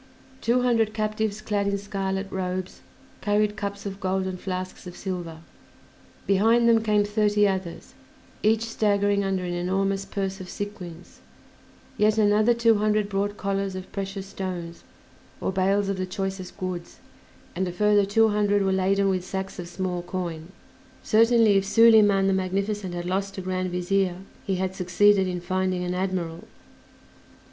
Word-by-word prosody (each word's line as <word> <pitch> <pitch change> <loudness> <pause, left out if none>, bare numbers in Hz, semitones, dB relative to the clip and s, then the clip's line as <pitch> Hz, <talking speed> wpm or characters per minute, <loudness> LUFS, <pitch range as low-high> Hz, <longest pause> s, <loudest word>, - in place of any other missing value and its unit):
Two 245 +2 +2
hundred 225 -3 +2
captives 215 -1 -1
clad 205 -2 -1
in 200 0 0
scarlet 195 -1 -3
robes 185 0 -4 0.4
carried 210 0 +1
cups 200 -1 -5
of 195 -1 -5
gold 190 0 -1
and 185 -1 -4
flasks 185 0 -5
of 175 - -9
silver; 175 -4 -5 0.8
behind 225 +4 +4
them 230 -1 +5
came 210 -2 +2
thirty 210 0 +2
others, 190 -3 -4 0.5
each 220 +1 +3
staggering 205 -2 +1
under 190 -1 -1
an 175 -1 -3
enormous 195 +2 0
purse 195 -1 -4
of 180 - -9
sequins; 190 -5 -8 0.8
yet 215 +1 +3
another 215 +2 +4
two 230 -2 +3
hundred 210 -1 +1
brought 205 +1 -1
collars 195 -1 -2
of 185 0 -8
precious 195 0 -4
stones 180 -3 -6 0.6
or - - -1
bales 195 +2 +1
of 195 -1 -1
the 185 0 -2
choicest 190 0 -5
goods; 180 -2 -5 0.6
and 185 +1 -1
a - - -3
further 205 +3 +3
two 220 +3 +3
hundred 205 -1 +2
were 190 - +1
laden 195 +1 +2
with 185 -2 0
sacks 190 +1 -5
of 175 - -5
small 180 0 -3
coin. 175 -2 -5 0.5
Certainly 225 -2 +4
if 195 - +2
Soliman 205 -2 +5
the 195 - +3
Magnificent 190 0 -2
had 175 0 -4
lost 195 +2 -2
a - - -3
Grand 185 0 -2
Vizier 180 +1 0 0.3
he 195 - +1
had 190 0 -2
succeeded 190 +2 +3
in 180 -1 -3
finding 185 0 -1
an 180 0 -2
admiral! 180 -3 -3
195 Hz, 155 wpm, -25 LUFS, 185-205 Hz, 0.8 s, them